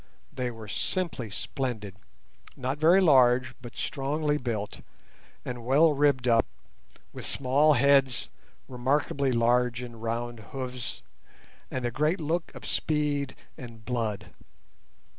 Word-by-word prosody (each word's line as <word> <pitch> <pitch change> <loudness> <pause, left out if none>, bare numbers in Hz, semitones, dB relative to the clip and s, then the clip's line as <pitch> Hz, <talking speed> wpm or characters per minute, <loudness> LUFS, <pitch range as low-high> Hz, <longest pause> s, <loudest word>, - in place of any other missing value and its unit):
They 125 -1 -2
were 115 -2 -9
simply 150 - -2
splendid, 105 -1 -4 0.6
not 130 +2 -3
very 170 +5 +6
large 130 -6 +5
but 120 -1 -10
strongly 150 +2 -1
built, 110 -5 -4 0.6
and 120 -2 -5
well 150 +6 +5
ribbed 140 -3 +2
up, 115 -1 +4 0.7
with - - -6
small 140 +4 +3
heads, 135 -2 +3 0.4
remarkably 135 +2 0
large 120 +1 +2
and 120 -2 -9
round 120 +1 -3
hoofs, 130 -2 -5 0.7
and 130 -1 -3
a 120 - 0
great 155 - +1
look 165 +2 -2
of - - -9
speed 145 -3 -1 0.2
and 115 -3 -10
blood. 115 -4 -2
130 Hz, 120 wpm, -28 LUFS, 120-145 Hz, 0.7 s, very